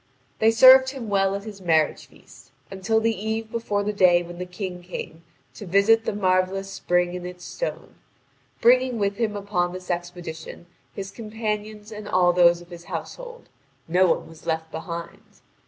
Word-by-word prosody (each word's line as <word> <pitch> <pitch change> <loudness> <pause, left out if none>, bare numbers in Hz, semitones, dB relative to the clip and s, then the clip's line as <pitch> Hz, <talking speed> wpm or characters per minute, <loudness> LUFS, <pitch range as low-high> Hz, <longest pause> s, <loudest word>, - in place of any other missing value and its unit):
They 220 - +5
served 260 +3 +8
him 260 -5 -7
well 195 -1 +2
at 200 - -5
his 205 -2 -9
marriage 160 -4 +1
feast, 120 - -19 0.2
until 195 +4 0
the 225 0 +1
eve 220 +2 -4
before 210 -3 -1
the 210 +1 -2
day 180 -3 +4
when 175 0 -10
the 180 - -5
King 180 -1 -6
came 175 -2 -8 0.3
to 205 - -10
visit 210 +5 +4
the - - -1
marvellous 190 0 0
spring 175 -2 0
and 180 - -6
its 180 0 -8
stone, - - -5 0.7
bringing 250 +1 +4
with 200 -1 -1
him 220 -3 -1
upon 190 -3 -1
this 185 0 -6
expedition 175 -1 -6 0.3
his 195 -1 -6
companions 215 -1 -5
and 210 -1 -8
all 180 -2 +3
those 175 -1 +5
of 175 +1 -16
his 170 0 -10
household; 485 -1 -7 0.4
not 180 +3 +4
one - - 0
was 160 -1 -15
left 160 0 -2
behind. 170 +1 -7
195 Hz, 170 wpm, -24 LUFS, 175-220 Hz, 0.7 s, served